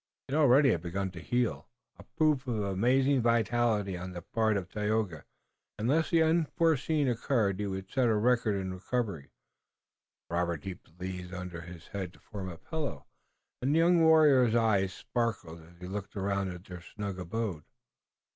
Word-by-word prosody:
It - - -10
had 150 - +2
already 135 -1 +6
begun 95 +3 -3
to 90 - -9
heal, 120 +2 -1 0.3
a - - -14
proof 155 -5 0
of 120 -3 -1
amazing 125 +8 +2
vitality 115 -4 +1
on 90 +1 -6
the 85 -1 -7
part 110 +1 +1
of 95 -2 -4
Tayoga, 105 -5 -2 0.5
and 115 +4 0
unless 160 +2 +2
the 165 -3 +4
unforeseen 160 -2 +2
occurred 115 -5 +1
he 105 - -1
would 95 0 -4
set 125 +3 +1
a 110 - +3
record 115 -1 +2
in 95 -1 -3
recovery. 100 - -3 1.0
Robert 85 -2 -1
heaped 90 -3 -9
the 90 - -6
leaves 90 -1 -6
under 90 -2 -6
his 85 -1 -11
head 95 -3 -5
to - - -19
form 95 -3 -7
a 85 - -8
pillow, 160 - -5 0.6
and 135 +4 +1
the - - +4
young 170 +1 +5
warrior's 150 -7 +6
eyes 105 -5 +2
sparkled 100 -7 -3
as 85 +2 -18
he 90 - -8
looked 100 +2 -6
around 100 -1 -1
at 90 -1 -8
their 90 -2 -9
snug 100 0 -6
abode. 90 -3 -3
105 Hz, 175 wpm, -30 LUFS, 90-125 Hz, 1.0 s, already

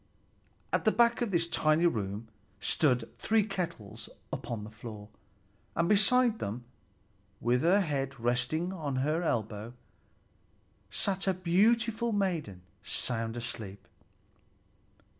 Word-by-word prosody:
At - - +2
the 215 - +5
back 235 +2 +4
of 240 - +1
this 170 -3 +1
tiny 155 0 +3
room 105 - -1 0.3
stood 125 -1 +1
three 220 -1 +3
kettles 175 - -5 0.2
upon 115 -3 -4
the 105 - -8
floor; 110 -2 -9 0.7
and 170 +1 +2
beside 220 +3 +4
them, 115 +5 -4 0.8
with 125 +2 +2
her 185 +5 +5
head 140 -5 -2
resting 125 +10 0
on 150 -7 -3
her 155 +3 +1
elbow, 110 - -2 1.1
sat 195 -1 -1
a 190 - +3
beautiful 225 +6 +2
maiden, 165 - -1 0.2
sound 115 0 -2
asleep. 110 -4 -6
155 Hz, 115 wpm, -31 LUFS, -, 1.1 s, the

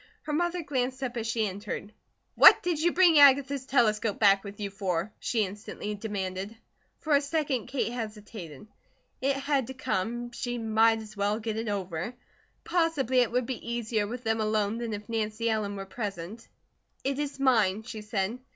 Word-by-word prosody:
Her 300 - -4
mother 345 +2 0
glanced 260 -2 -2
up 250 -1 -3
as 230 -1 -3
she 225 -1 0
entered. 205 +2 -6 0.4
"What - - +8
did 345 -4 0
you 345 +1 +3
bring 345 -4 +6
Agatha's 275 -1 +5
telescope 220 -5 +2
back 200 -2 +5
with 200 0 -9
you 200 -1 -3
for?" 190 -1 -2
she 220 -4 0
instantly 205 +1 -6
demanded. 200 0 -4 0.4
For 305 -2 +2
a 280 - +4
second 280 -5 -1
Kate 255 -2 -1
hesitated. 210 - -7 0.6
It 275 +1 +2
had 275 -2 0
to 265 - -7
come, 240 +2 -2
she 245 0 -4
might 225 0 +3
as 215 0 -12
well 205 +1 0
get 220 -1 -3
it 225 +1 -3
over. 190 +2 -3 0.5
Possibly 325 -7 +1
it 245 -2 +2
would 250 0 +1
be 255 0 -5
easier 220 -3 -1
with 245 +3 -6
them 225 -1 0
alone 215 0 0
than 235 -2 -3
if 210 0 -6
Nancy 225 0 -2
Ellen 210 -2 -1
were 195 0 -6
present. 195 -1 -6 0.6
"It 275 +1 -1
is 290 -1 -3
mine," 220 -6 +3
she 220 -2 -7
said. 210 +2 -2
225 Hz, 180 wpm, -28 LUFS, 205-260 Hz, 0.6 s, What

